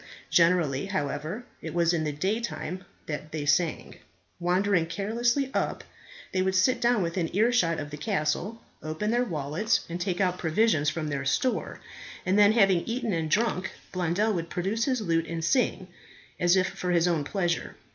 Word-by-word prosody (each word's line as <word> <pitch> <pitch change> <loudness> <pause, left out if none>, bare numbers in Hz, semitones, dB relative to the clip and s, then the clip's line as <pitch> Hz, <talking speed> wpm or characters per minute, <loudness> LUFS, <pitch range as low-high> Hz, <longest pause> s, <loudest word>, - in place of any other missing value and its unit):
Generally, 165 -5 +3
however, 185 - -3 0.2
it - - -6
was 170 0 +3
in 160 -2 0
the 150 - -1
day 190 +10 -1
time 185 -5 -5 0.2
that 155 0 -5
they 155 -2 -3
sang. 160 +2 0 0.4
Wandering 180 0 +2
carelessly 235 +9 0
up, - - -1 0.5
they 185 - +1
would 190 0 +1
sit 245 +7 +3
down 240 -4 +3
within 170 0 -1
earshot 210 -7 +3
of 145 -1 -5
the 150 - -6
castle, 195 +5 -2 0.2
open 155 +8 -2
their 240 +1 +2
wallets, 170 - 0
and 170 +1 -5
take 180 -1 -1
out 180 -2 +1
provisions 160 -3 +2
from 155 0 -3
their 140 -1 -2
store, 245 - -1 0.5
and 185 +1 +2
then, 205 +1 +6
having 195 -5 +4
eaten 235 -2 -1
and 160 -2 -1
drunk, 210 -1 +1 0.2
Blondel 185 +5 +1
would 170 -3 -3
produce 200 +6 -1
his 255 -4 0
lute 165 -4 0
and 165 0 -3
sing, 230 -7 +1 0.5
as 175 0 +4
if 185 -1 +3
for 185 -1 -5
his 175 -1 +3
own 165 -4 +1
pleasure. 175 +1 -2
180 Hz, 175 wpm, -27 LUFS, 165-210 Hz, 0.5 s, then